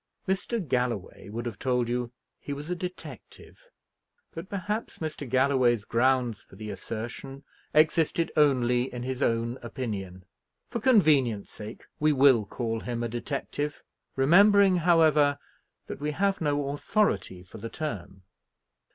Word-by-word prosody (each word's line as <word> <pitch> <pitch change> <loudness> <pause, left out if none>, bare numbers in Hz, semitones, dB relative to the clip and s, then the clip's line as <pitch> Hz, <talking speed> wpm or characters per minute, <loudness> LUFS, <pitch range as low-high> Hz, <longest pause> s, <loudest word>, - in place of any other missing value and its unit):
Mr. 195 +5 -1
Galloway 120 -7 -2
would 115 +3 -5
have 115 -5 -5
told 125 -2 0
you 120 0 -2 0.3
he 145 - -5
was 145 +4 -6
a - - 0
detective; 180 - -9 0.7
but 165 +3 -8
perhaps 205 +3 -3
Mr. 155 -4 -5
Galloway's 130 -4 +3
grounds 120 -1 +1
for - - -18
the 105 +1 -6
assertion 120 +7 -6 0.3
existed 160 +1 +3
only 125 -4 +3
in 125 -1 -5
his 130 +1 -4
own 115 +1 0
opinion. 100 -7 -5 0.5
For 235 - -2
convenience 150 - +3
sake 110 +2 -9
we 155 0 +3
will 130 -5 +5
call 115 +2 -3
him 120 0 -4
a - - 0
detective; 140 +4 -4 0.3
remembering, 195 +7 +6
however, 155 -4 +4 0.5
that - - -7
we 150 +1 -1
have 195 +3 0
no 145 -2 0
authority 140 - 0
for 90 - -12
the 115 - -6
term. 95 - -6
135 Hz, 135 wpm, -27 LUFS, 115-155 Hz, 0.7 s, remembering